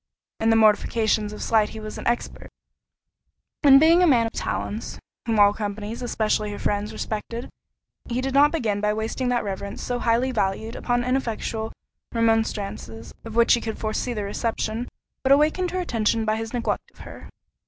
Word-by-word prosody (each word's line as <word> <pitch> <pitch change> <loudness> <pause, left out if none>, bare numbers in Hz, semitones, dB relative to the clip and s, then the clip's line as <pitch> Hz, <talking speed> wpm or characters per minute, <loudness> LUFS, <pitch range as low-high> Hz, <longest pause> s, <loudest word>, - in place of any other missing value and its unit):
In 225 - +2
the 225 - +5
mortifications 215 0 +2
of 210 - -6
slight 215 -2 +2
he 220 - -8
was 215 0 -7
expert; 240 0 -3 1.1
and 275 -2 +8
being 330 +4 +6
a 360 - +5
man 240 -6 +4
of 225 - -3
talents, 220 0 -4 0.3
whom 225 -1 +1
all 205 0 +6
companies, 210 +2 -5
especially 215 -3 0
her 205 - -5
friends, 205 +1 -1
respected, 225 +2 -5 0.6
he 240 +1 -1
did 265 +1 -2
not 285 +2 +6
begin 220 -10 -1
by 210 0 +1
wasting 225 +4 -2
that 240 -2 +1
reverence 200 0 -5
so 245 -1 -2
highly 240 +3 +1
valued 220 0 -1
upon 245 0 0
ineffectual 230 -3 -2 0.4
remonstrances, 215 - -1
of 225 -1 -8
which 235 0 +5
he 235 - +2
could 220 -1 -4
foresee 215 +3 -2
the 210 - -2
reception, 225 +3 -2 0.4
but 275 +1 +6
wakened 315 +5 +1
her 370 +1 -2
attention 225 -7 0
by 215 0 +1
his 225 0 -4
neglect 245 -2 -2
of - - -18
her. - - -11
225 Hz, 175 wpm, -24 LUFS, 215-245 Hz, 1.1 s, and